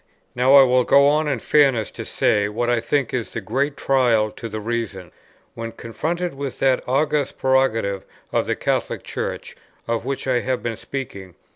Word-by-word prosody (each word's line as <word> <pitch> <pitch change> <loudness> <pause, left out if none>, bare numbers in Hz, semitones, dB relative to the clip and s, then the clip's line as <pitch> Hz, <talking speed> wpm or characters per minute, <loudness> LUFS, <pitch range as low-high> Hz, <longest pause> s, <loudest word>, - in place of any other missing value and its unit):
Now 130 +3 +4
I 140 - +10
will 125 -1 +3
go 140 +3 +5
on 150 +1 +2
in 135 -3 0
fairness 135 -3 +2
to - - -7
say 105 0 +1
what 120 +3 -1
I 120 - +2
think 140 +1 -1
is 120 -3 -3
the - - -3
great 135 +8 -2
trial 120 -5 +2
to 115 - -8
the 110 0 -5
Reason, 105 -5 -4 0.4
when 115 0 -6
confronted 165 +10 -3
with 135 -1 -5
that 130 -1 +2
august 145 +1 0
prerogative 115 -7 +1 0.3
of - - +1
the - - 0
Catholic - - -2
Church, - - -5 0.3
of 115 -1 -1
which 135 +2 -3
I 130 -2 +2
have 130 +1 -2
been 115 -1 -2
speaking. 100 -8 -7
125 Hz, 180 wpm, -22 LUFS, 115-135 Hz, 0.4 s, I